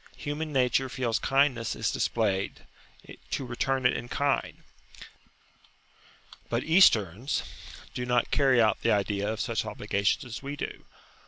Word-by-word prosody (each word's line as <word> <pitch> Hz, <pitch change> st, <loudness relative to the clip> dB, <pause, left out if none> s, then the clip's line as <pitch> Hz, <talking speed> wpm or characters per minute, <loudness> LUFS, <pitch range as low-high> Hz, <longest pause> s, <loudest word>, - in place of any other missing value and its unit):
Human 150 Hz, +2 st, -4 dB
nature 130 Hz, -1 st, +2 dB
feels 125 Hz, -3 st, -1 dB
kindness 135 Hz, -4 st, +1 dB
is -, -, -1 dB
displayed 100 Hz, -4 st, -1 dB, 0.7 s
to 135 Hz, -, -2 dB
return 130 Hz, +2 st, -1 dB
it 125 Hz, -, +4 dB
in 120 Hz, -, -5 dB
kind. 140 Hz, -1 st, -1 dB, 1.9 s
But 120 Hz, +1 st, -1 dB
Easterns 125 Hz, -, +3 dB, 0.5 s
do 125 Hz, -, -3 dB
not 125 Hz, -1 st, +1 dB
carry 135 Hz, -3 st, +4 dB
out 110 Hz, -3 st, +3 dB
the -, -, +1 dB
idea 100 Hz, 0 st, 0 dB
of 110 Hz, -, -5 dB
such 115 Hz, -1 st, -1 dB
obligations 105 Hz, +4 st, -1 dB
as 120 Hz, -2 st, -7 dB
we 140 Hz, +1 st, -5 dB
do. -, -, -6 dB
125 Hz, 135 wpm, -28 LUFS, 110-135 Hz, 1.9 s, it